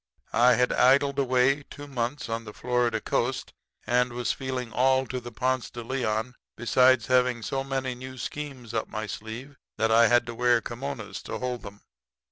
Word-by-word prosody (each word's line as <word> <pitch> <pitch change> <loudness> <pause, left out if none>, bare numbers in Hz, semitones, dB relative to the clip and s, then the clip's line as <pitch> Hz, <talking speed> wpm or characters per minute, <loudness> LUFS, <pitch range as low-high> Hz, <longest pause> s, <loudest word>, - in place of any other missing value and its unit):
I 125 +2 +6
had 125 0 +2
idled 140 +2 +4
away 130 +1 +3
two 145 - -9
months 125 -1 -3
on 115 0 -3
the 105 -1 -9
Florida 120 -2 0
coast, 125 +4 -1 0.3
and 125 +1 +2
was 120 0 -1
feeling 130 -3 -4
all 130 +1 +3
to 125 +1 -4
the 120 0 -9
Ponce 130 +2 -1
de 120 - -7
Leon, 120 -1 -1 0.2
besides 125 +1 +4
having 125 -2 +2
so 135 +3 -2
many 135 -1 -2
new 130 +1 -9
schemes 130 -4 -6
up 110 - -1
my 110 0 -4
sleeve 115 +7 -7 0.2
that 110 0 +2
I 115 +1 +6
had 120 0 +4
to 120 - -6
wear 120 0 +3
kimonos 120 -4 -6
to - - -4
hold 125 -1 -3
'em. 100 0 -12
125 Hz, 180 wpm, -27 LUFS, 115-130 Hz, 0.3 s, I